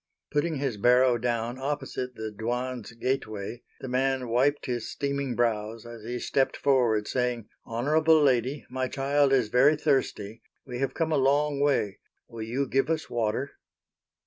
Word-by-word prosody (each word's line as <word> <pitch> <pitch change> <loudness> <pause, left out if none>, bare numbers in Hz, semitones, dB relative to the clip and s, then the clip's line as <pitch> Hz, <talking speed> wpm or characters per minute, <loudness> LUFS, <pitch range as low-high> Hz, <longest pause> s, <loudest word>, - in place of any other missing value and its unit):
Putting 155 +2 0
his 135 -5 -2
barrow 125 +2 +4
down 120 +1 -2
opposite 135 -2 -3
the 110 -1 -5
Dwan's 120 +1 -3
gateway 115 -3 -3 0.2
the 130 - -5
man 130 0 0
wiped 135 +5 +2
his 120 -3 -3
steaming 140 -2 -2
brows 115 -1 -1
as 120 -1 -9
he 120 +2 -4
stepped 135 +2 0
forward 120 -7 +2
saying, 125 -3 -1 0.2
"Honorable 155 +7 +3
Lady, 135 0 +1
my 130 +1 -2
child 140 +1 +1
is 125 -5 +3
very 135 +6 +5
thirsty, 130 -8 -1 0.2
we 125 -2 -6
have 135 - -1
come 165 -1 0
a - - +3
long 140 +2 +2
way, 140 -9 +1 0.3
will 115 -1 -9
you 120 +6 -1
give 135 +4 +1
us 160 -1 -2
water?" 120 +3 -1
125 Hz, 155 wpm, -27 LUFS, 115-140 Hz, 0.3 s, very